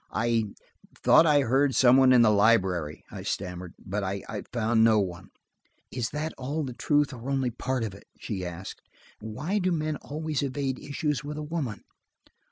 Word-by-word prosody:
"I–thought 115 +7 +1
I 145 -2 +5
heard 135 +2 +2
some 125 0 +6
one 130 -1 +6
in 125 -2 +7
the 110 - +5
library," 95 -7 +2
I - - -7
stammered, 90 -2 -5
"but 100 +2 -4
I 95 +1 -3 0.3
found 115 -1 +2
no 110 -1 +5
one." 95 0 -4 0.6
"Is 120 -2 -2
that 155 +2 -3
all 145 +5 -2
the 130 -3 -5
truth 145 +3 +1
or 125 +2 -7
only 135 -3 0
part 130 +1 -2
of 105 -4 -4
it?" 100 - -15
she 95 -5 -5
asked. 90 +2 -7 0.4
"Why 145 - -3
do 185 -1 +1
men 155 -2 -1
always 155 +1 -3
evade 135 -1 -2
issues 150 -1 -2
with 150 +1 -6
a 150 - -4
woman?" 150 -8 -4
125 Hz, 175 wpm, -27 LUFS, 105-145 Hz, 0.6 s, in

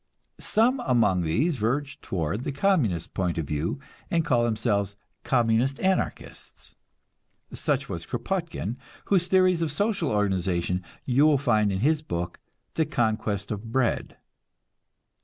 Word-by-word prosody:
Some 245 +5 +2
among 115 - +2
these 130 - +1
verge 135 +6 -1
toward 95 +5 -2
the 145 - -2
Communist 135 - +1
point 90 -3 -1
of 80 - -1
view, 75 - -2 0.3
and 165 -2 +1
call 125 -6 +3
themselves 105 -3 0 0.3
Communist 120 +2 +2
anarchists; 190 0 -3 0.8
such - - -1
was - - -6
Kropotkin, 165 - -3 0.3
whose 180 -3 +2
theories 185 -2 +3
of 160 -3 0
social 200 -2 0
organization 95 -3 0 0.2
you 135 +4 +4
will 150 -2 +4
find 110 -7 +2
in 95 0 -2
his 150 +4 +2
book 85 - -4 0.3
"The 160 -2 +1
Conquest 110 -7 -1
of 110 +2 -5
Bread." 125 -1 0
120 Hz, 130 wpm, -26 LUFS, 100-155 Hz, 0.8 s, you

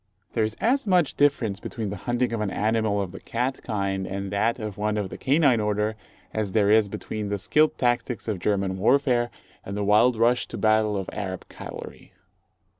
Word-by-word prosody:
There 115 - +1
is 110 0 -2
as 255 +1 +1
much 180 -6 +3
difference 130 -9 +1
between 110 -4 -5
the - - -3
hunting 120 0 +1
of 115 - -1
an 105 - 0
animal 110 0 +1
of 95 -3 -3
the 95 - -9
cat 125 +3 -2
kind 100 -4 -2
and 100 0 -4
that 110 +3 +1
of 105 -4 -5
one 105 +1 -1
of 100 -3 -3
the - - -6
canine 140 -3 +3
order, 105 +1 0 0.4
as 105 -3 -2
there 105 -2 +3
is 110 -2 +4
between 105 +1 -5
the 100 - -1
skilled 150 +10 +2
tactics 120 -2 0
of 105 -4 -2
German 95 -1 0
warfare, 120 +1 +3 0.3
and 100 +1 -5
the 105 - -1
wild 110 +4 +4
rush 120 +2 +2
to - - -7
battle 110 -1 +2
of 95 - -4
Arab 95 -3 -5
cavalry. - - -9
110 Hz, 195 wpm, -25 LUFS, 100-120 Hz, 0.4 s, is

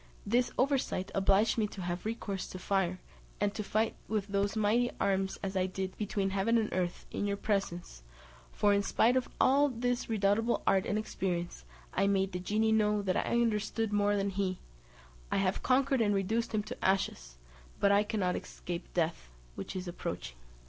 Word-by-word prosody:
This 240 +4 +2
oversight 255 -8 0
obliged 195 +4 +3
me 215 - +2
to 195 -2 -8
have 175 +1 -3
recourse 205 -4 -3
to - - -7
fire, 185 -1 0 0.4
and 205 0 +1
to 210 - -3
fight 215 +2 0
with 215 -3 -1
those 200 +1 0
mighty 220 +3 +2
arms 195 -1 0
as 195 0 -3
I 185 0 +2
did, 190 0 -4
between 200 -2 -1
heaven 200 +4 +2
and 220 -2 0
earth, 180 -1 -2
in 205 - -2
your 200 0 -1
presence; 185 - -2 0.5
for, 205 0 +3
in 200 - +3
spite 230 +4 +3
of 255 -1 0
all 285 +2 +5
his 245 0 -1
redoubtable 220 +2 +1
art 195 -1 +3
and 205 - 0
experience, 175 - -3 0.3
I 195 - +2
made 195 -1 +2
the 180 - -3
genie 215 +4 +1
know 210 -1 +2
that 185 -2 0
I - - 0
understood 220 -1 0
more 205 0 +3
than 200 0 0
he; 190 -1 -1 0.7
I - - +2
have 195 -1 +1
conquered 265 0 +2
and 205 -2 +3
reduced 220 +4 0
him 215 -2 0
to 210 - -8
ashes, - - 0 0.4
but 200 - +4
I 200 0 +5
cannot 210 -4 0
escape 175 0 -6
death, 165 - -1 0.2
which 95 - -7
is 185 -1 -4
approaching." 90 - -5
200 Hz, 185 wpm, -31 LUFS, 190-220 Hz, 0.7 s, all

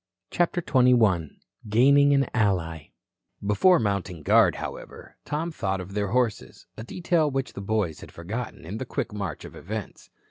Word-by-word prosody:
CHAPTER 175 0 0
XXI 115 - +3 0.4
GAINING 140 +6 +5
AN 135 -2 +2
ALLY 85 -7 -1 0.5
Before 140 - +4
mounting 100 -6 -2
guard, - - +4
however, - - -8
Tom 155 +3 -3
thought 95 -10 -2
of 95 +1 -8
their 105 0 -1
horses, 115 0 -2
a 110 - -7
detail 170 +3 0
which 135 -1 -3
the - - -7
boys 100 -6 -1
had - - -12
forgotten 100 +1 -6
in 100 +7 -6
the 130 - -4
quick 115 - -3
march 100 -7 -5
of - - -11
events. 105 +3 -7
110 Hz, 155 wpm, -25 LUFS, 95-135 Hz, 0.5 s, GAINING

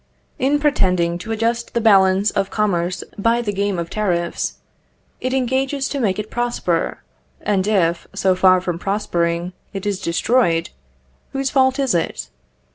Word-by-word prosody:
In 275 +3 +2
pretending 180 - +1
to 220 - -6
adjust 230 +2 -1
the - - +3
balance 195 -2 +4
of 195 - -1
commerce 185 -4 -1 0.2
by 230 +3 +2
the 205 -2 -2
game 200 -1 -1
of 170 0 -4
tariffs, 175 -5 -1 0.6
it 255 - -2
engages 265 +2 0
to 280 - -3
make 200 -7 +1
it 210 0 -5
prosper; 240 -8 -1 0.4
and 200 -2 0
if, 175 -5 +1
so 190 -1 +2
far 185 0 +4
from 175 -2 -3
prospering, 175 -3 -1 0.2
it 195 0 -5
is 200 -2 -1
destroyed, 170 -1 +1 0.6
whose 270 -1 -1
fault 260 0 +3
is 270 -4 +1
it? 165 - -2
200 Hz, 150 wpm, -20 LUFS, 180-240 Hz, 0.6 s, balance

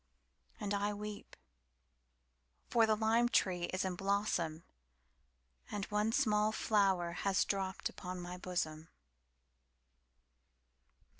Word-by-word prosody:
And 205 -2 -2
I 205 +1 0
weep; 210 0 -7 1.4
For 230 -2 +5
the 215 - +4
lime 225 +2 +3
tree 180 -6 +2
is 185 +2 -2
in 185 -1 -1
blossomAnd 180 -5 0 1.3
one 210 +1 +1
small 215 -4 +3
flower 195 -5 +2
has 195 +2 +1
dropped 190 -1 -1
upon 180 0 -6
my 175 0 -6
bosom. 165 -4 -3
200 Hz, 95 wpm, -35 LUFS, 180-210 Hz, 1.4 s, For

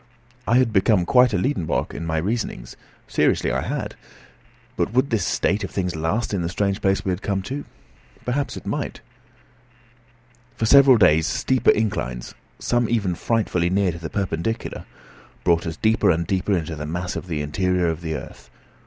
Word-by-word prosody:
I 115 +4 +4
had 125 -3 +2
become 95 -2 +3
quite 125 +4 +5
a 100 - +1
Liedenbrock 90 - -1
in 80 +3 -5
my 80 0 -1
reasonings; 110 +9 -3 0.3
seriously - - +1
I - - 0
had. - - -3 0.8
But 105 - -1
would 130 +2 +2
this 110 -5 +1
state 100 +3 0
of 95 - -3
things 90 -3 -2
last 80 +9 -1
in 95 - 0
the 85 - -2
strange 100 +2 -1
place 95 0 +1
we 95 - +1
had 90 +2 -3
come 100 -2 -1
to? 140 +8 -5 0.6
Perhaps 135 +3 -1
it - - -9
might. - - -3 1.5
For 110 - -1
several 135 +1 +7
days 80 -6 +4
steeper 130 -1 +1
inclines, 65 - 0 0.2
some 120 -2 0
even 105 -6 +1
frightfully 90 -3 0
near 95 0 +2
to 85 - -8
the 80 -2 -6
perpendicular, 100 +2 -3 0.6
brought 85 0 +2
us 80 - -4
deeper 110 -2 +2
and 85 -1 +2
deeper 95 +2 0
into 80 -1 -4
the 75 0 -6
mass 90 +3 -3
of - - -5
the 75 -4 -2
interior 90 +4 0
of 80 0 -2
the 80 -2 -3
earth. 70 - -9
95 Hz, 180 wpm, -23 LUFS, 85-110 Hz, 1.5 s, several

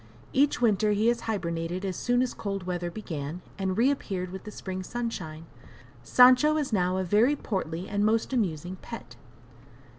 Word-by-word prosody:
Each 280 +2 +3
winter 215 -3 +3
he 215 +3 +3
has 240 -1 0
hibernated 170 -2 -2
as 190 -2 -2
soon 245 +5 +2
as 255 - -2
cold 195 -2 -4
weather 175 -1 -3
began, 170 -4 -6 0.2
and 190 0 -1
reappeared 215 -8 0
with 190 0 -8
the - - -6
spring 190 -2 -5
sunshine. 185 -8 -5 0.6
Sancho 255 +5 +6
is 285 -6 -2
now 185 -2 +2
a 190 - 0
very 215 +10 +3
portly, 185 - -3
and 205 0 0
most 225 +4 +1
amusing 180 - -1
pet. 230 - -9
195 Hz, 160 wpm, -28 LUFS, 180-235 Hz, 0.6 s, Sancho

